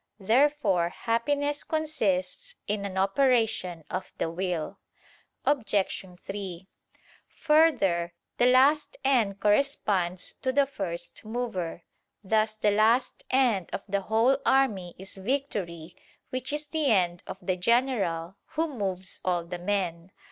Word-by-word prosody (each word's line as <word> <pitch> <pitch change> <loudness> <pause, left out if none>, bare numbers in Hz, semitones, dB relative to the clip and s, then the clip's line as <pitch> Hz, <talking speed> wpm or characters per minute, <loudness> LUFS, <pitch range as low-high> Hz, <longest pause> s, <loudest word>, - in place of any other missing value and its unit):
Therefore 220 -5 +3
happiness 285 +8 -1
consists 310 - -1
in 205 -1 -2
an 190 -1 -5
operation 200 - +2
of 190 - -5
the 165 - -1
will. 175 -2 -3 0.7
Obj. 215 -11 +1 0.2
3: 190 -2 -6 0.6
Further, 250 - +2 0.2
the 245 - +4
last 275 +4 +4
end 225 -8 +2
corresponds 205 -6 +1
to 260 - +1
the 280 +1 +3
first 180 -10 -6
mover: 215 -7 -4 0.4
thus 215 +2 +1
the 215 -1 +2
last 225 +5 +2
end 240 -9 +2
of - - -4
the 200 0 0
whole 230 +7 +2
army 210 -10 +2
is 190 +1 -8
victory, 190 - -3 0.4
which 255 +2 -2
is 295 +1 -1
the 305 0 -1
end 180 -7 +2
of - - -6
the 185 -1 -1
general, 195 -5 +1 0.2
who 320 -1 0
moves 190 -4 -3
all 175 -2 0
the 175 +1 -6
men. 180 -2 -2
205 Hz, 125 wpm, -27 LUFS, 185-265 Hz, 0.7 s, the